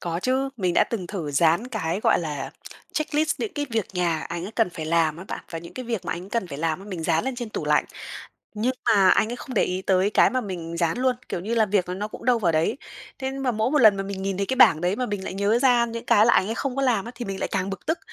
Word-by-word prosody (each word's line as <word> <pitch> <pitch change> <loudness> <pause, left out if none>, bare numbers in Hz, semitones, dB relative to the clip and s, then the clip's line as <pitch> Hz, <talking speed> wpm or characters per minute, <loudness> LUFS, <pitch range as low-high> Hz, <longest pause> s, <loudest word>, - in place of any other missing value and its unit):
Có 170 0 -3
chứ. 265 +1 +1
Mình 180 -4 0
đã - - +5
từng 200 -7 -4
thử 170 -6 -4
dán 165 - +3
cái 190 -5 -2
gọi - - +3
là 155 -4 -4 0.4
checklist 310 0 0
những 420 - -3
cái 290 -1 -2
việc 225 -3 0
nhà 170 -3 0
anh 170 +1 -5
ấy 205 - -7
cần 225 -4 +1
phải 165 -2 -6
làm 160 -1 +2
á 175 - -9
bạn. - - -6
Và 165 - -4
những 170 +1 -11
cái 255 - -6
việc 230 -5 -3
mà - - -2
anh 180 +3 -7
cần 230 -4 -1
phải 140 -5 -7
làm, 165 +5 -2
mình 175 -4 -4
dán 160 0 +1
lên 265 - -2
trên 240 -2 -5
tủ - - -4
lạnh. - - +3 0.7
Nhưng 225 +5 0
mà 195 -3 +5
anh 220 - +3
ấy - - -4
không 255 - -8
để - - +3
ý 185 +1 -3
tới 190 +1 +2
cái - - +4
mà 255 - 0
mình 175 -6 -6
dán 170 +3 0
luôn, 255 -1 +1
kiểu - - -3
như 215 +6 -2
là, 225 -2 +3
việc 200 -2 +1
nó 195 +4 -3
cũng 225 - -10
đâu 245 -1 +3
vào 175 -6 +1
đấy. 155 +1 +1 0.4
Thế 265 -1 -2
mà 270 -1 -1
mỗi 220 +2 0
một 300 - +3
lần 215 -6 +7
mà 195 - -2
mình 195 -1 -5
nhìn 195 -1 -2
thấy 200 +1 -1
cái 260 - -1
bảng 160 -11 +6
đấy 180 +3 0
mà 250 +1 -1
mình 205 -2 -4
lại - - -5
nhớ 200 +4 +2
ra 245 -2 +4
những 230 0 -6
cái 215 -2 +5
là 235 - +5
anh 190 - +3
ấy 225 - -2
không 265 +1 -3
có 275 - 0
làm 240 -7 +2
á 235 - -7
thì 240 0 -6
mình 195 -1 -5
lại - - -1
càng 195 0 -1
bực 195 -2 -7
tức. 320 - 0
200 Hz, 300 wpm, -24 LUFS, 175-240 Hz, 0.7 s, lần